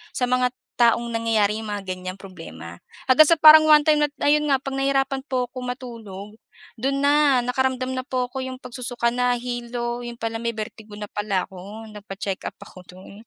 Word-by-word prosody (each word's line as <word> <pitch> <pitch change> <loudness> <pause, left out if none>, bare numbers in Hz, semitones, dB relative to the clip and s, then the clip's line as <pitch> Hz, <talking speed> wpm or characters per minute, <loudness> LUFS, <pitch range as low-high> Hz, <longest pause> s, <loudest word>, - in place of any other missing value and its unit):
sa 250 - -1
mga 250 0 +2 0.3
taong 235 0 +3
nangyayari 220 -2 +1
yung 220 - -7
mga 195 -2 -5
ganyang 185 0 -6
problema. 85 - -10 0.2
Hanggang 290 +4 +6
sa 335 - +5
parang 310 0 +8
one-time 300 0 +5
na 295 - +3 0.2
ayun 300 +1 +3
nga, 270 -1 +1
'pag 270 - -4
nahirapan 270 0 +1
po 250 -3 -2
ko 255 - -7
matulog, 230 -5 -8 0.4
dun 275 +3 -1
na 285 -3 +4
nakaramdam 255 +1 -1
na 255 0 -4
po 250 -1 -2
ako 265 - -5
yung 260 - -6
pagsusuka 240 -1 -2
nahilo, 240 -1 -2
yun 240 -1 -7
pala 225 -1 -4
may 235 -1 -3
vertigo 215 -1 -8
na 210 -1 -8
pala 205 -3 -1
ako, 195 +4 -10 0.2
nagpa-check-up 195 -1 -5
ako 185 - -14 0.2
dun. 190 +1 -13
240 Hz, 175 wpm, -23 LUFS, 210-265 Hz, 0.4 s, parang